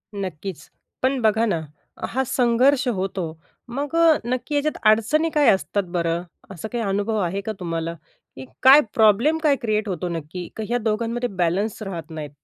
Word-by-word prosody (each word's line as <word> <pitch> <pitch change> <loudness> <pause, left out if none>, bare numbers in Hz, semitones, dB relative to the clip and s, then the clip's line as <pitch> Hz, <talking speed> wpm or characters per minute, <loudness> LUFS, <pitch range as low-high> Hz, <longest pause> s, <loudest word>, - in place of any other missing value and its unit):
नक्कीच. 185 -4 -6 0.3
पण 260 +1 +1
बघा 220 +1 +3
ना. 170 -7 0 0.5
हा 265 +2 -1
संघर्ष 255 +3 +3
होतो 190 -5 -2 0.4
मग 285 +5 -4
अ, 330 -1 +6
नक्की 255 +4 -2
याच्यात 295 +1 0
अडचणी 300 +9 +2
काय 295 -2 +5
असतात 200 +1 +1
बरं? 170 0 0 0.3
असा 190 +3 -6
काही 235 +1 -3
अनुभव 205 +2 -1
आहे 190 +3 -1
का 220 - -4
तुम्हाला, 165 -1 -3 0.4
की 130 - -8 0.2
काय 275 +3 +9
प्रॉब्लेम 225 +8 +4
काय 295 -3 +4
क्रिएट 215 -2 0
होतो 180 -1 -3
नक्की 170 +2 -5
की 220 - -3
ह्या 240 +1 +1
दोघांमध्ये 230 +2 -1
बॅलेन्स 190 +4 -1
राहत 170 -4 -6
नाहीत? 155 -2 -6
215 Hz, 165 wpm, -23 LUFS, 180-250 Hz, 0.5 s, काय